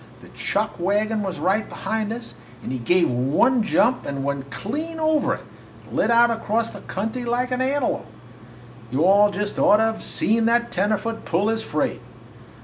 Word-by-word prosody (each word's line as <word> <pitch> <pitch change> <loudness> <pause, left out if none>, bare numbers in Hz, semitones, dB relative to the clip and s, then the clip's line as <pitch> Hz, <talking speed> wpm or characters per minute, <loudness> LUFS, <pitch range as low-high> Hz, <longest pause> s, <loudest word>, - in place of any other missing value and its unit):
The - - -14
chuck 215 -1 -2
wagon 210 +4 0
was 190 -3 -4
right 200 +4 0
behind 220 -1 -3
us, 230 +1 -7 0.3
and - - -5
he 130 - -3
give 175 +9 +3
one 140 - +2
jump 235 +3 +2
and 140 -1 -4
went 140 -1 -3
clean 305 - -5
over 315 -2 +2
it - - -13 0.4
and - - -10
lit - - +2
out 235 0 +5
across 230 0 -1
country 225 +6 -3
like 245 +2 -1
an 250 0 0
antelope. 270 0 0 0.8
You 135 +7 +1
all 200 +2 +6
just 205 0 -3
ought 210 - +6
to 225 +1 +2
've - - -10
seen 225 +1 +1
that 235 +1 +2
tenderfoot 215 +4 -1
pull 190 +6 +1
his 225 0 0
freight! - - -2
220 Hz, 175 wpm, -23 LUFS, 190-235 Hz, 0.8 s, all